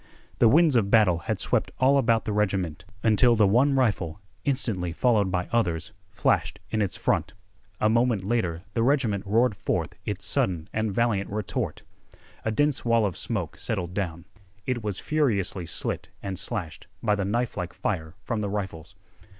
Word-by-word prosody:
The 120 - +6
winds 155 +1 +5
of 105 -4 +3
battle 100 -6 +4
had - - 0
swept - - +1
all 135 +2 +5
about 115 -3 +2
the 105 - -1
regiment, 95 -7 -1 0.2
until 115 +2 +5
the 105 -2 +5
one 125 +8 +4
rifle, 100 -10 0 0.3
instantly 110 -11 0
followed 105 +1 +2
by 90 -1 -1
others, 90 -9 0 0.2
flashed - - 0
in 110 - +1
its 100 - -1
front. - - 0 0.4
A 105 - +3
moment 115 -2 +2
later 95 -6 -1
the 115 - 0
regiment 120 -6 +2
roared 115 +2 +3
forth - - -2
its - - -3
sudden 85 -3 0
and 110 -1 0
valiant 105 -2 0
retort. 105 -1 -3 0.6
A - - 0
dense 145 +5 +1
wall 115 -2 +3
of 95 -5 -2
smoke - - -3
settled 90 -1 -2
down. 85 -3 -3 0.4
It 125 -3 -2
was 105 -3 -2
furiously 100 - 0
slit - - -3
and 95 -2 -4
slashed 90 -4 -5 0.2
by 105 -2 +3
the 100 -1 0
knifelike 100 -4 -2
fire 80 -5 -3
from 115 -3 -2
the 100 - -2
rifles. 95 -6 -5
105 Hz, 165 wpm, -26 LUFS, 95-120 Hz, 0.6 s, The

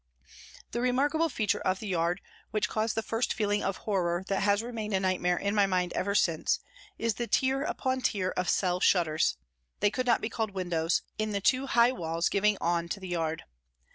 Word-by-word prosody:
The 235 - -2
remarkable 290 +6 +2
feature 210 -5 0
of 185 0 0
the 215 - -6
yard, 175 +1 0 0.3
which 215 - 0
caused 220 0 -1
the 225 - -1
first 225 +2 -1
feeling 205 -1 +1
of 195 -1 -1
horror 180 -4 -1
that 195 - 0
has 205 +2 +2
remained 220 -4 -3
a - - +2
nightmare 180 -2 +1
in 200 0 -1
my 205 -2 +4
mind 180 -2 0
ever 200 +1 -1
since, 165 -6 +2 0.4
is 230 -1 0
the 235 +3 -4
tier 265 +2 +2
upon 260 -5 -1
tier 195 -6 0
of 180 - -1
cell 180 -2 +1
shutters, 165 - +2 0.4
they 205 - +3
could 255 +2 -2
not 235 - +4
be - - -2
called 220 -3 -3
windows, 170 -3 0 0.2
in 215 -1 -1
the 200 - 0
two 255 +7 +2
high 240 -1 +4
walls 165 -7 -1
giving 205 +1 +2
on 170 0 0
to 200 - -3
the 190 -1 -8
yard. 165 -2 -2
200 Hz, 200 wpm, -29 LUFS, 180-230 Hz, 0.4 s, my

